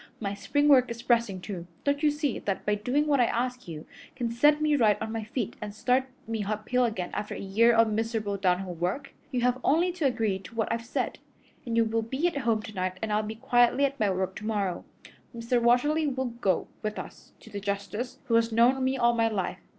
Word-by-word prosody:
My 200 -2 -3
spring 290 +8 0
work 255 -4 +6
is 235 0 -6
pressing, 230 -6 +1
too. 175 -2 -6 0.2
Don't 285 0 0
you 305 - +4
see 295 -3 -1
that 195 -2 -3
by 210 - +2
doing 250 +8 0
what 290 -2 +2
I 245 - +5
ask 250 0 -2
you 155 -2 -7 0.3
can 235 -2 -2
set 295 +6 +4
me 305 -1 +2
right 220 -6 +3
on 220 0 -4
my 225 -1 -3
feet 230 -1 -3
and 210 -1 -6
start 255 +3 +2 0.2
me 225 -2 -2
uphill 215 +5 0
again 190 -6 -3
after 210 0 -4
a - - -6
year 215 +5 +3
of 230 -1 +4
miserable 220 -2 -1
downhill 185 -1 0
work? 180 - -3 0.2
You 255 -4 -1
have 250 +1 +2
only 340 +5 +3
to 340 -5 0
agree 225 -6 0
to 185 +3 -13
what 225 0 0
I've 230 0 -4
said, - - -2 0.5
and 230 -1 -1
you 230 - +4
will 225 +1 0
be 265 +8 -2
at 340 - -2
home 230 -5 0
tonight 185 -5 -3
and 215 -1 -1
I'll 210 - +2
be 215 +1 -5
quietly 245 +3 +3
at 275 0 -3
my 210 -2 +2
work 190 0 -2
tomorrow. 205 -4 -2 0.5
Mr. 235 +1 0
Watterly 295 +7 +3
will 260 -1 -1 0.2
go 190 - +1
with 215 0 -3
us - - -9
to 220 - -14
the 200 - -4
justice, 205 +4 -4
who 230 - -2
has 230 0 +3
known 245 +4 +4
me 260 +1 +1
all 235 -1 +3
my 230 -1 +2
life. 210 -4 -2
230 Hz, 230 wpm, -28 LUFS, 210-255 Hz, 0.5 s, work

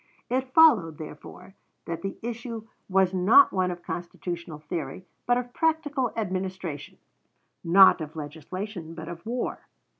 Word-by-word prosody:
It 260 +1 -1
followed, 235 - +5
therefore, 170 +4 -10 0.3
that 165 0 -4
the 195 - -5
issue 230 -1 -5 0.2
was 190 -1 +3
not 200 - +6
one 185 -1 +1
of 175 -1 -6
constitutional 170 -2 -5
theory, 155 +2 -5 0.2
but 245 0 +4
of 245 0 -4
practical 300 -6 0
administration; 185 -6 -4 0.7
not 185 +1 +7
of 155 0 -7
legislation, 165 +4 -6
but 160 - -8
of 170 -1 -8
war. 245 +1 -3
185 Hz, 130 wpm, -26 LUFS, 165-235 Hz, 0.7 s, not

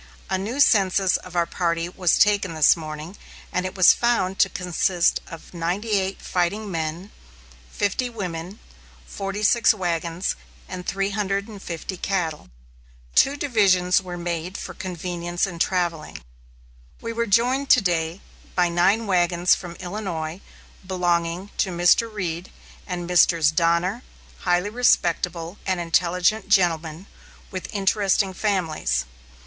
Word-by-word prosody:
A 190 - +2
new 225 +8 -4
census 195 -7 +4
of 180 -1 -12
our 170 -1 +2
party 170 -1 -1
was 180 -1 +1
taken 200 -4 +2
this 155 -1 +6
morning; 155 +2 -7 0.4
and 180 +1 0
it 185 - -8
was 185 -2 +8
found 195 -6 0
to 195 - +5
consist 180 -1 0
of 165 +2 -11
98 190 +3 -1
fighting 195 +4 -1
men, 165 +4 -4 0.6
50 205 +5 -1
women, 185 -4 -6 0.5
46 205 - +1
wagons, 170 -1 -2 0.3
and 180 -1 -7
350 195 -2 -3
cattle. 170 - -2 0.6
Two 280 +1 +4
divisions 195 -9 +3
were 180 -1 -7
made 175 +1 -4
for - - -7
convenience 175 -1 -3
in 175 -4 -7
travelling. 170 - -1 0.8
We 230 - -5
were 235 0 -1
joined 250 +6 +2
to 250 - +7
day 170 -1 -1 0.3
by 180 -1 +3
nine 195 +6 +2
wagons 175 -2 +3
from 175 -2 -4
Illinois 180 -3 -5 0.4
belonging 175 0 -1
to 195 - +1
Mr. 175 +6 +3
Reed 180 -4 -4 0.4
and 180 -2 -4
Messrs. 170 -2 +4
Donner, 170 +6 +1 0.4
highly 180 +3 0
respectable 175 -6 +1
and 185 -2 0
intelligent 180 +4 +1
gentlemen 170 -3 +1 0.5
with 185 -2 -6
interesting 195 -1 +1
families. 160 - -1
180 Hz, 120 wpm, -23 LUFS, 170-200 Hz, 0.8 s, was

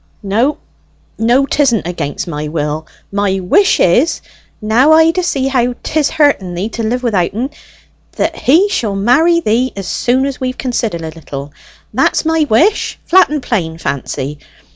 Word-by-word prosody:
"No, 230 +9 +1 0.6
no, 240 +5 +3
'tisn't 270 - +1
against 175 +1 -4
my 150 -2 -4
will. 150 0 -3 0.2
My 200 -1 0
wish 385 - +3
is, 245 - +3 0.4
now 240 +8 +3
I 320 +1 +5
d'see 330 -7 -1
how 250 -2 0
'tis 310 -2 0
hurten 280 - +1
thee 190 +5 -3
to 230 - -5
live 245 +3 -2
without 195 -6 0
en, 255 +6 -2 0.6
that - - -1
he 335 +10 +3
shall 225 - -2
marry 315 +12 +3
thee 245 +1 +1
as 195 -2 -6
soon 255 +2 +1
as 275 -2 -5
we've 255 0 -3
considered 230 -9 -2
a 160 - -5
little. 145 -3 -8 0.4
That's - - +1
my 320 -1 +1
wish 335 - +2
flat 375 +2 +5
and 295 -2 -3
plain, 165 -8 -2
Fancy. 140 -1 -4
235 Hz, 160 wpm, -14 LUFS, 180-280 Hz, 0.6 s, I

